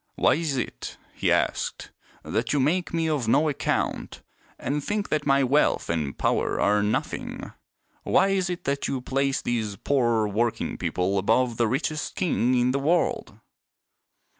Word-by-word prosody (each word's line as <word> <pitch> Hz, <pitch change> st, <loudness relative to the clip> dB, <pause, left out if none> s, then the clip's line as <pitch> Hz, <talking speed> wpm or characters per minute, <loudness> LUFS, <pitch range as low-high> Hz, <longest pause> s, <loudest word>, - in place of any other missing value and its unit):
" -, -, -48 dB
Why -, -, +3 dB
is 155 Hz, -4 st, -1 dB
it," 125 Hz, -, -5 dB, 0.2 s
he -, -, 0 dB
asked, -, -, -1 dB, 0.2 s
" -, -, -29 dB
that 115 Hz, +2 st, -2 dB
you 145 Hz, -, +2 dB
make 170 Hz, +7 st, +1 dB
me 165 Hz, -1 st, 0 dB
of 145 Hz, -7 st, -1 dB
no 145 Hz, +7 st, +3 dB
account 145 Hz, -, -2 dB, 0.3 s
and 145 Hz, +1 st, -2 dB
think 205 Hz, +3 st, -2 dB
that 150 Hz, -1 st, -1 dB
my 135 Hz, 0 st, +4 dB
wealth 135 Hz, -, +2 dB
and 75 Hz, -4 st, -2 dB
power -, -, 0 dB
are 105 Hz, 0 st, +3 dB
nothing? 105 Hz, +1 st, -3 dB, 0.5 s
Why 195 Hz, -, +3 dB
is 190 Hz, -2 st, 0 dB
it 175 Hz, -1 st, -4 dB
that 140 Hz, 0 st, -1 dB
you 135 Hz, -, -2 dB
place 135 Hz, +1 st, -1 dB
these 110 Hz, -4 st, -2 dB
poor 120 Hz, -4 st, +1 dB
working 115 Hz, +3 st, -1 dB
people 95 Hz, +2 st, 0 dB
above 115 Hz, +4 st, +1 dB
the 115 Hz, -, +2 dB
richest 150 Hz, +5 st, -2 dB
king 135 Hz, -, +1 dB
in 125 Hz, 0 st, +2 dB
the 135 Hz, -, 0 dB
world 165 Hz, +5 st, 0 dB
135 Hz, 165 wpm, -25 LUFS, 115-150 Hz, 0.5 s, my